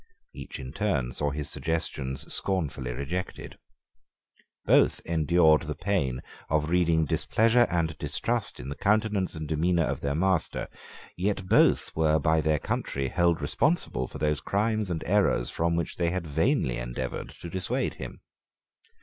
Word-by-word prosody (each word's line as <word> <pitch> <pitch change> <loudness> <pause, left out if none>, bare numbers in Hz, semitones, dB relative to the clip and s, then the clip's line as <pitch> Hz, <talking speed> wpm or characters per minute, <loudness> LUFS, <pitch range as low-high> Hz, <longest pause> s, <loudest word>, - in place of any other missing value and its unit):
Each 70 - -8
in 65 0 -7
turn 75 -9 -1
saw 75 +3 -1
his 75 0 -4
suggestions 70 -5 -2
scornfully 75 -10 -1
rejected. 70 +9 -5 1.1
Both - - +4
endured 80 -1 +4
the 75 -2 -5
pain 70 -8 -1 0.3
of 75 +1 +1
reading 85 -3 +3
displeasure 115 - +3
and 85 -2 0
distrust 115 -4 -1
in 65 +2 -7
the 70 - -4
countenance 105 -2 +1
and 80 -1 -5
demeanour 85 +3 +1
of - - -3
their 70 0 -1
master; 90 0 +1 0.5
yet 95 +1 -1
both - - +3
were 80 -1 +3
by 80 +1 +2
their 75 0 +2
country 70 -1 -2
held 85 -1 +2
responsible 75 - 0
for - - -9
those 75 -1 0
crimes 105 +2 0
and 80 -3 -3
errors 100 -11 +2
from 85 0 0
which 85 -2 -3
they 85 -1 +1
had 90 0 -3
vainly 65 -4 +1
endeavoured - - -4
to - - -7
dissuade 90 +1 -2
him. - - -9
80 Hz, 150 wpm, -27 LUFS, 70-90 Hz, 1.1 s, Both